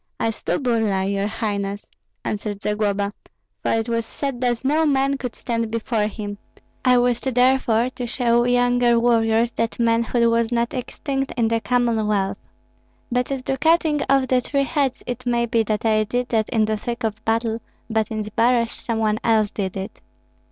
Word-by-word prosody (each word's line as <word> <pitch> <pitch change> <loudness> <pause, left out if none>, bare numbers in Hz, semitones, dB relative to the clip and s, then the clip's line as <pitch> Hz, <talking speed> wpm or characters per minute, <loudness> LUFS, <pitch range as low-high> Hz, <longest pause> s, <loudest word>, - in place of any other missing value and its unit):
"I 225 - +1
slew - - -2
Burlai, 215 -7 0
your 200 0 0
highness," 205 -2 -3 0.4
answered 205 -1 -3
Zagloba, 205 -1 0 0.5
"for - - 0
it 225 +1 0
was 230 -1 0
said 265 +2 -5
that 245 0 0
no 305 +4 +3
man 275 -2 +2
could 250 -3 -5
stand 230 -2 -2
before 225 -1 -1
him. 205 -1 -6 0.4
I 250 -1 +5
wished 245 +1 +1
therefore 250 -1 +3
to 250 -2 -5
show 240 -1 +2
younger 245 -1 +3
warriors 230 0 +3
that 230 -1 -2
manhood 235 0 +2
was 230 0 +1
not 235 0 0
extinct 270 +1 -3
in 230 -2 +2
the 230 0 0
Commonwealth. 215 -6 +1 0.7
But 250 +2 0
as 265 -2 -3
to 270 +1 -1
cutting 315 0 +3
off 270 -1 +3
the 255 -1 +2
three 275 +2 0
heads, 275 -2 -1
it 245 0 -5
may 235 0 +2
be 230 -1 +1
that 215 0 -2
I 215 -1 +3
did 245 +3 -2
that 220 -2 +1
in 220 -3 +2
the 215 0 -1
thick 235 +2 -5
of 215 -1 -2
battle; 225 0 0 0.3
but 220 -1 0
in 215 -1 -2
Zbaraj 230 +2 +2
some 230 -2 -4
one 215 -1 +1
else 220 -2 +2
did 190 -2 -3
it." 190 0 -7
230 Hz, 180 wpm, -22 LUFS, 215-250 Hz, 0.7 s, I